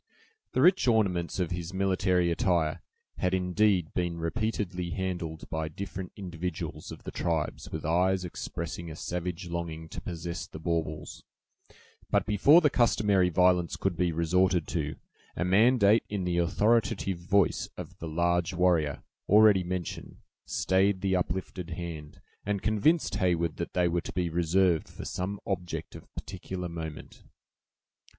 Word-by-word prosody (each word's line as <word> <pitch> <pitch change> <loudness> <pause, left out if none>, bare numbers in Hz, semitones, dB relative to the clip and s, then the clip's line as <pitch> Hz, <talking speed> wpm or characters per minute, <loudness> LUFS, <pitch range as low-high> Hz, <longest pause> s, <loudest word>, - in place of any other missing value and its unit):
The - - +2
rich 185 -5 +5
ornaments 95 -7 +2
of 90 -1 -1
his 85 +1 -4
military 95 -2 +2
attire 85 -2 +1 0.4
had 90 0 +1
indeed 90 -1 +2
been 85 -2 -1
repeatedly 90 0 -2
handled 90 -4 -4
by 80 -1 -2
different 95 +2 -6
individuals 90 -2 -5
of - - -10
the - - -6
tribes 80 -3 -2
with 80 - -5
eyes 90 +3 +2
expressing 85 0 -5
a 80 - -7
savage 90 +1 -4
longing 85 -1 -4
to - - -7
possess 85 0 -5
the - - -10
baubles; 80 -2 -3 0.9
but - - +2
before 125 - +6
the 150 - +4
customary 105 -7 +3
violence 90 0 +3
could 95 -2 -1
be 85 +1 +1
resorted 85 +1 +2
to, 75 -2 -2 0.4
a 90 - -1
mandate 110 +2 +5
in 100 -2 -2
the 90 -1 0
authoritative 100 0 +1
voice 95 +2 +1
of - - -9
the 80 - -5
large 85 +2 +1
warrior, 85 -5 +2 0.3
already 105 -2 +6
mentioned, 90 -1 -5 0.3
stayed 95 0 +2
the 95 -1 +1
uplifted 90 0 -3
hand, 80 -3 -7 0.2
and 100 -1 -2
convinced 110 - +2
Heyward 85 -3 +1
that 85 - -4
they 90 -1 +2
were 85 0 0
to - - -7
be 90 -2 0
reserved 85 +1 +2
for - - -9
some 95 +2 -3
object 90 -3 -4
of - - -12
particular 95 -1 -5
moment. 80 -3 -7
90 Hz, 145 wpm, -29 LUFS, 85-95 Hz, 0.9 s, before